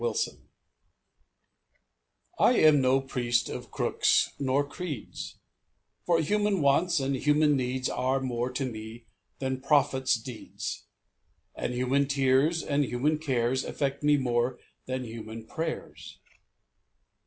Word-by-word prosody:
RELIGION 460 -1 -2 1.9
I 245 - +5
am 155 - +5
no 130 +1 +3
priest 120 -3 0
of - - -6
crooks - - +2
nor 140 +1 +1
creeds, 150 - -6 0.7
For 170 -2 +4
human 205 +4 +1
wants 165 +5 +3
and 135 0 0
human 150 +2 +3
needs 130 0 -1
Are 130 +2 0
more 125 -1 -2
to 135 +1 -1
me 115 -1 -7 0.3
than 130 -1 -3
prophets' 130 -3 +3
deeds; 120 -1 -7 0.7
And 125 - -3
human 130 +3 +1
tears 135 +4 +2
and 145 0 +1
human 145 +4 0
cares 130 -4 0
Affect 140 -1 -2
me 145 0 +4
more 125 -1 0 0.3
than 130 0 -2
human 110 -1 -8
prayers. 160 +5 -6
135 Hz, 120 wpm, -28 LUFS, 125-150 Hz, 1.9 s, I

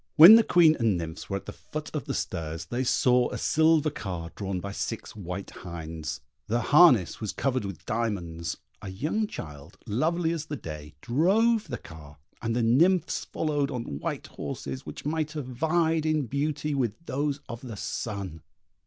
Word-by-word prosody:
When 165 +7 +12
the 230 - +9
Queen 165 -6 +5
and 110 -6 +2
nymphs 80 0 -6
were 100 - 0
at 100 - -10
the - - -6
foot - - -7
of - - -2
the - - -3
stairs 80 0 -3
they 125 +2 -2
saw 125 0 +3
a - - -4
silver 160 -1 +3
car 85 -8 -5
drawn 95 -2 -3
by 100 +2 -5
six 100 - -4
white 95 -1 -6
hinds: 80 -4 -6 0.3
their 115 +2 +1
harness 125 - +5
was 110 - -2
covered 130 -5 -1
with 100 -5 -7
diamonds; 90 -8 -2 0.2
a 100 - -6
young 155 - -1
child, 75 - -9
lovely 160 +9 +1
as 160 -2 -3
the 150 - -3
day, 75 - -8
drove 205 - +3
the 125 -5 -4
car, 75 -3 -13 0.2
and 115 0 -1
the 120 - +1
nymphs 165 +11 +3
followed 145 -3 -1
on 115 - -4
white - - -3
horses 65 -1 -6
which - - -8
might 155 +1 -1
have 150 -4 -4
vied 160 +4 +1
in 155 -3 +1
beauty 145 +3 -1
with 125 -6 0
those 145 0 -1
of 120 0 -7
the 115 -5 -7
sun. 100 -7 -4
120 Hz, 180 wpm, -27 LUFS, -, 0.3 s, When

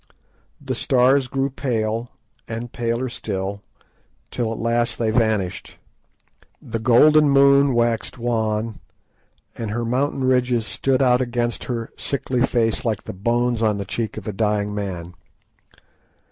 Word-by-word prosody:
The - - -4
stars 130 +1 +3
grew 135 +1 -1
pale 115 -3 -2 0.4
and 115 +1 -5
paler 115 +2 -1
still, 100 -4 -4 0.7
till 115 -3 -2
at 115 - -4
last 115 0 0
they 110 -2 0
vanished; 110 -5 -1 0.8
the 115 - -5
golden 150 +6 +5
moon 140 -1 +5
waxed 120 0 0
wan, 110 -2 -1 0.8
and 115 -2 -4
her 120 +3 -2
mountain 135 +3 0
ridges 125 -3 +2
stood 135 +3 0
out 125 -1 +4
against 120 -1 -2
her 115 -2 -4
sickly 130 -2 -1
face 115 -1 +1
like 110 -5 -1
the - - -7
bones 120 +4 0
on 110 -2 +2
the 100 - -4
cheek 110 +3 -4
of - - -7
a 105 - -3
dying 105 0 0
man. 90 -4 -5
115 Hz, 135 wpm, -22 LUFS, 110-125 Hz, 0.8 s, golden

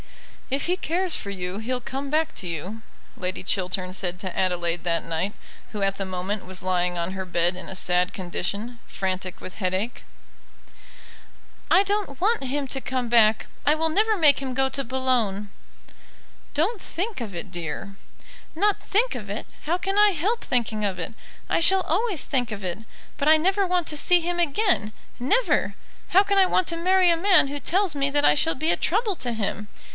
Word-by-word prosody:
"If 275 +1 -1
he 360 - +1
cares 360 0 -1
for 200 - -5
you 185 0 -4
he'll 250 +3 -2
come 270 +3 -5
back 315 +2 +1
to 185 - -5
you," 180 +7 -5 0.3
Lady 185 0 -4
Chiltern 185 -1 -1
said 180 -2 -2
to 185 -2 -5
Adelaide 175 -2 0
that 170 -1 0
night, 165 +5 -2 0.4
who 210 - -5
at 195 0 +1
the 195 - -3
moment 185 +2 -3
was 185 0 -3
lying 180 -1 +1
on 170 +1 -2
her 190 0 -4
bed 175 0 +1
in 185 - -8
a 190 - -6
sad 180 0 +2
condition, 200 +6 -4
frantic 185 -1 -4
with 185 - -9
headache. 190 +4 -2 1.7
"I 380 - +6
don't 405 -8 -2
want 430 -2 +2
him 275 +1 -2
to 270 - -2
come 255 -3 -2
back; 220 -2 +4 0.2
I 295 - +4
will 320 +1 +1
never 430 +6 +2
make 300 -5 +5
him 260 -2 -4
go 270 0 +3
to 275 +1 -2
Boulogne." 235 -6 0 1.1
"Don't 370 +8 +1
think 390 - -4
of 215 -4 -5
it, 170 +3 -5
dear." 175 +3 -5 0.6
"Not 410 +5 +2
think 460 +5 +1
of - - -7
it! - - -4 0.2
how 335 +4 0
can 390 +2 -2
I 420 0 +7
help 400 +6 -1
thinking 225 -4 0
of 195 -3 -1
it? - - -4 0.3
I - - +1
shall 380 +3 +5
always 375 - 0
think 245 -4 0
of 205 -2 -6
it. 180 +1 -3 0.4
But 295 +1 +2
I 315 - +8
never 380 +4 +2
want 360 -2 0
to 305 - -3
see 355 +4 +5
him 350 +1 -2
again 340 - +2 0.3
never! 415 - +1 0.3
How 385 +3 +6
can 400 -1 +2
I 380 - +6
want 365 - +1
to 335 - -1
marry 365 +2 +4
a - - +4
man 365 -3 +4
who 285 +1 -4
tells 375 +2 +1
me 280 0 +1
that 290 +1 +2
I - - +6
shall 325 +2 +2
be 315 +5 +1
a - - +3
trouble 420 +2 +1
to 245 - -2
him? 210 -2 -3
260 Hz, 195 wpm, -25 LUFS, -, 1.7 s, I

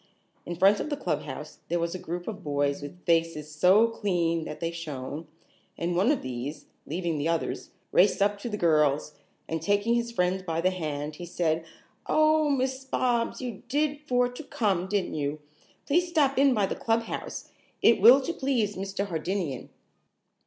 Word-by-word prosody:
In 175 - -3
front 195 +4 +5
of - - -3
the 290 - -2
clubhouse - - -4
there 175 - 0
was 170 0 -1
a 185 - -5
group 175 +1 -5
of 205 -3 -6
boys 145 -1 0
with 145 +5 -10
faces 165 -2 +1
so 185 +8 +5
clean 175 -7 0
that 150 - -7
they 165 0 -2
shone, 155 -2 -6 0.5
and 175 +1 -1
one 190 +7 +3
of 290 - -1
these, 130 +4 -5 0.2
leaving 165 -1 -2
the 145 - 0
others, 165 -1 -2 0.2
raced 190 +3 +4
up 205 +1 +2
to 235 - -5
the 210 - -3
girls, 150 -4 +2 0.3
and 160 -1 -3
taking 205 +6 +2
his 235 0 0
friend 185 -3 0
by 165 -2 -2
the 185 +2 +2
hand, 150 -4 -4
he 175 - -7
said: 165 -2 0 0.4
"Oh, 310 0 +4
Miss 265 -1 0
Bobs, 245 -2 0
you 240 -6 -5
did 290 +1 0
for 250 -2 +3
to 250 +5 -8
come, 195 -9 0
didn't 200 -1 -1
you? 145 0 -2 0.5
Please 350 +5 +2
stop 290 -5 +2
in 275 -2 +5
by 205 -2 +2
the - - -2
clubhouse. 230 0 -2 0.3
It 230 - +5
will 245 +6 +9
to 335 - -2
please 245 - 0
Mr. 195 +1 -3
Hardinian." 170 -5 -3
185 Hz, 180 wpm, -27 LUFS, 165-235 Hz, 0.5 s, will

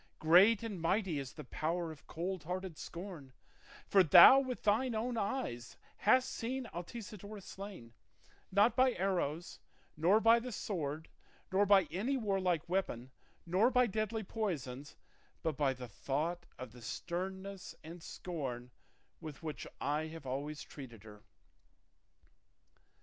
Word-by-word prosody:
Great 195 +8 +6
and 205 -7 -5
mighty 175 -2 +1
is 135 -2 -6
the - - -8
power 165 +5 -2
of 155 - -14
cold 180 0 -4
hearted 180 0 -4
scorn, 170 -6 -8 0.5
for 195 - +5
thou 180 - +10
with 260 -2 -4
thine 225 +4 +2
own 235 +3 -1
eyes 200 - -3 0.2
hast 255 +5 +4
seen 255 +2 -3
Altisidora 205 +3 -7
slain, 190 - -9 0.6
not 205 +4 +4
by 255 0 +4
arrows, 175 -4 -2 0.4
nor 175 +8 +4
by 230 +1 +6
the 250 +2 -6
sword, 160 -8 -3 0.4
nor 200 +2 +3
by 195 -1 +7
any 230 +11 0
warlike 190 - 0
weapon, 130 -9 -2 0.3
nor 185 +8 +3
by 250 -1 +4
deadly 215 0 -2
poisons, 145 - -4 0.5
but 160 -3 0
by 140 -1 +2
the 125 -1 -7
thought 155 - -3
of 130 -3 -8
the 125 +1 -14
sternness 190 - -5
and 165 +2 -9
scorn 130 -10 -5 0.5
with 155 -2 -9
which 155 -3 -5
I 150 +2 -1
have 160 -2 -10
always 145 +4 -4
treated 120 -7 -11
her." 105 -1 -13
180 Hz, 135 wpm, -34 LUFS, 150-210 Hz, 0.6 s, thou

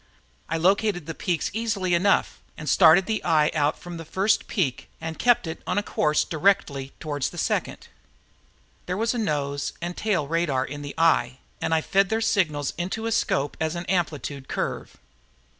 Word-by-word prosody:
I 165 - 0
located 190 0 +2
the 165 - -5
peaks 170 -2 -2
easily 210 -5 -1
enough 185 +4 +2 0.2
and 155 - -7
started 170 +5 +6
the 220 -1 -2
eye 155 -3 +3
out 150 -1 +1
from 175 -1 -8
the 165 - -7
first 195 +6 +1
peak 145 - -1
and 160 0 -6
kept 245 -5 +3
it 160 0 -6
on - - -1
a 205 - +2
course 150 -5 +1
directly 150 -6 +1
toward 145 -3 -4
the - - -2
second. - - -2 1.0
There 180 +1 -2
was 225 +3 +1
a 245 - -2
nose 145 -8 -1
and 175 +1 -4
tail 190 -9 0
radar 155 -5 0
in 145 +1 -7
the 145 0 -7
eye 160 -7 +3 0.2
and - - -1
I 160 -1 +3
fed 195 +3 +2
their 220 - +1
signals 155 -10 0
into 190 +6 -3
a 230 - -1
scope 145 -9 0
as 160 +1 -1
an 170 +1 -4
amplitude 150 -7 -2
curve. - - -4
165 Hz, 180 wpm, -25 LUFS, 150-195 Hz, 1.0 s, started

